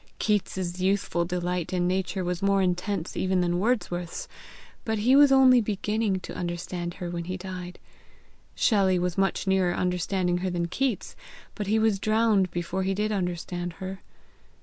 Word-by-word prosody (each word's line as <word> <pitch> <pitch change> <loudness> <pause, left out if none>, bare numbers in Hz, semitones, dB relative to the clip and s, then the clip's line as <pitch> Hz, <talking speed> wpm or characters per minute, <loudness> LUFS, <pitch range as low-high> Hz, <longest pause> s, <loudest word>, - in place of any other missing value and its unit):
Keats's 185 -3 -1
youthful 190 -2 +1
delight 180 -1 -2
in 180 -1 +1
Nature 190 +1 -1
was 180 +1 -2
more 195 -1 +3
intense 180 0 -2
even 185 -1 +1
than 175 0 +1
Wordsworth's, 180 -6 -1 0.6
but 220 -1 -1
he 240 +6 +4
was 285 0 +7
only 260 -2 +7
beginning 210 -1 -1
to - - -8
understand 175 0 -4
her 175 -1 -5
when 170 -1 -4
he 185 +1 -4
died. 180 -1 -7 0.8
Shelley 195 -5 +3
was 180 -1 -1
much 195 +1 0
nearer 190 -2 +2
understanding 180 0 0
her 185 +1 -1
than 170 -1 -2
Keats, 255 +1 -2 0.4
but 210 -2 -5
he 215 +2 +2
was 220 -3 +2
drowned 215 -3 +2
before 175 +2 -3
he 190 +1 0
did 210 +2 0
understand 175 -2 -3
her. 190 +2 -7
185 Hz, 160 wpm, -26 LUFS, 175-205 Hz, 0.8 s, was